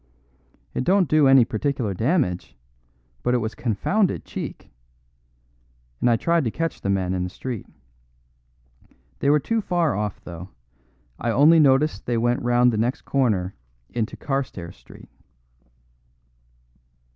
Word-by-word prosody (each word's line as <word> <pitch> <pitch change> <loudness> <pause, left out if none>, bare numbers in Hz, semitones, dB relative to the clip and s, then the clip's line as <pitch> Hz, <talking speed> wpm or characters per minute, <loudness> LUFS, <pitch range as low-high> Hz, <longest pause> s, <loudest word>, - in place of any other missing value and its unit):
It - - -1
don't 185 +3 +3
do 155 -2 +4
any 135 -3 +7
particular 115 -2 -2
damage, 110 - -1 0.6
but 125 - +1
it - - +4
was 110 -1 -3
confounded 130 - 0
cheek; - - -7 1.3
and - - +2
I 120 - +4
tried 170 +7 +1
to - - +1
catch 165 +8 -3
the 100 - -2
men 95 -2 0
in 90 -1 -1
the 90 - -3
street. 120 +2 -6 1.5
They 140 - +1
were 150 +1 +5
too 230 +9 -1
far 175 -6 0
off 105 -1 -3
though; 85 +1 -9 0.7
I 120 - -2
only 150 +8 +6
noticed 145 +1 +3
they 120 -1 +1
went 120 +2 +1
round 120 0 +3
the - - -1
next 120 +4 0
corner 105 -9 0 0.4
into 115 -2 -3
Carstairs 125 - -4
Street." - - -16
125 Hz, 135 wpm, -23 LUFS, 105-150 Hz, 1.5 s, any